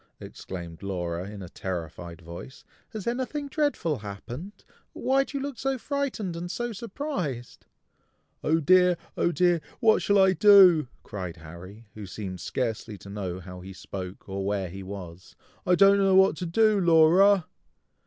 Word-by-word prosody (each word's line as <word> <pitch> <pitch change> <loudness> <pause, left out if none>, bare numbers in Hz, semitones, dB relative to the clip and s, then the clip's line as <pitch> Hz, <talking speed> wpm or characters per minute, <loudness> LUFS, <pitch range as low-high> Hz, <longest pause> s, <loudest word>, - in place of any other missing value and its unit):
exclaimed 85 -3 -9
Laura 90 -2 -4
in 105 -2 -8
a - - -8
terrified 85 -1 -6
voice. 85 - -10 0.3
"Has 215 -3 -7
anything 260 +4 -2
dreadful 275 - 0
happened? 120 - -9 0.3
Why 270 +1 +2
do 280 - -6
you 275 - -3
look 280 -3 -6
so 270 0 -1
frightened 255 - -3
and 175 +1 -5
so 240 +4 -3
surprised?" 195 - -5 0.8
"Oh 160 +2 +2
dear! 180 +3 +4 0.2
oh 175 - +1
dear! 175 -1 +2 0.2
what 225 -3 +4
shall 200 - +2
I 190 -1 +5
do?" 190 - +7 0.2
cried 90 -4 -6
Harry, 85 +7 -12
who 105 -2 -8
seemed 95 -2 -6
scarcely 115 -4 -3
to 100 - -12
know 95 -3 -4
how 90 0 -10
he 95 +1 -9
spoke, 95 0 -8
or 95 0 -4
where 100 -2 -2
he 95 +3 -8
was. 95 -2 -9 0.3
"I 180 - +5
don't 200 +2 +6
know 195 -1 +3
what 190 +1 +5
to 180 - -4
do, 215 +4 +3
Laura!" 175 +2 +5
155 Hz, 160 wpm, -26 LUFS, -, 0.8 s, do